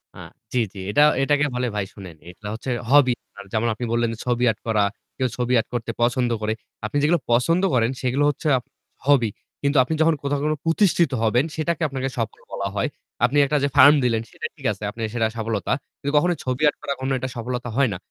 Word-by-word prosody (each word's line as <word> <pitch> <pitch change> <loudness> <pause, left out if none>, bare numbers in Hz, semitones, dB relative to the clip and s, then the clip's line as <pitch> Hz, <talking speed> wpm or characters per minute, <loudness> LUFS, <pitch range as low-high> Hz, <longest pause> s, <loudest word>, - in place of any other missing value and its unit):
আ - - -13 0.4
জি, 125 - +2
জি, 100 - -9
এটা 105 - +3 0.2
এটাকে 145 +2 +2
বলে 125 0 0
ভাই 105 -2 -1
শুনেন, 95 -5 -10
এটা 95 +4 -10
হচ্ছে 115 +4 -6 0.2
hobby। 140 -2 +6 0.4
যেমন 110 +1 +1
আপনি 120 +3 -5
বললেন 120 0 +1
যে - - -8
ছবি 125 -1 0
art 110 - -10
করা। 110 -2 +2 0.3
কেউ 130 - +1
ছবি 125 0 0
art 110 - -3
করতে 120 -1 -2
পছন্দ 120 +1 +2
করে। 110 0 0 0.3
আপনি 110 - -2
যেগুলো 165 +3 +3
পছন্দ 165 +10 +3
করেন 115 -1 +2
সেগুলো 130 +3 +1
হচ্ছে 145 +3 -3
আ - - -1 0.5
hobby। 135 -6 +4 0.3
কিন্তু 140 +1 +1
আপনি 145 - -3
যখন 160 0 +4
কোথাও 140 0 0
কোন 155 - +2
প্রতিষ্ঠিত 170 -2 +3
হবেন 120 +5 +3
সেটাকে 170 +2 -1
আপনাকে 135 -1 -3
সফল 115 -2 -3
বলা 100 - -3
হয়। 100 - +1 0.4
আপনি 140 +4 0
একটা 150 +2 +1
যে - - +3
farm 145 +2 +9
দিলেন 115 -2 +1
সেটা - - -7
ঠিক 140 -5 -14
আছে, 105 +1 -8
আপনার 115 +2 -6
সেটা 115 -2 +2
সফলতা। 110 -2 -2 0.3
কিন্তু 140 - -2
কখনোই 175 +3 +2
ছবি 130 +2 -2
art - - -7
করা 140 - -2
কোনো 130 +1 -1
একটা 130 +1 -4
সফলতা 120 +1 -4
হয় 140 -3 +4
না। - - -4
125 Hz, 215 wpm, -23 LUFS, 115-145 Hz, 0.5 s, farm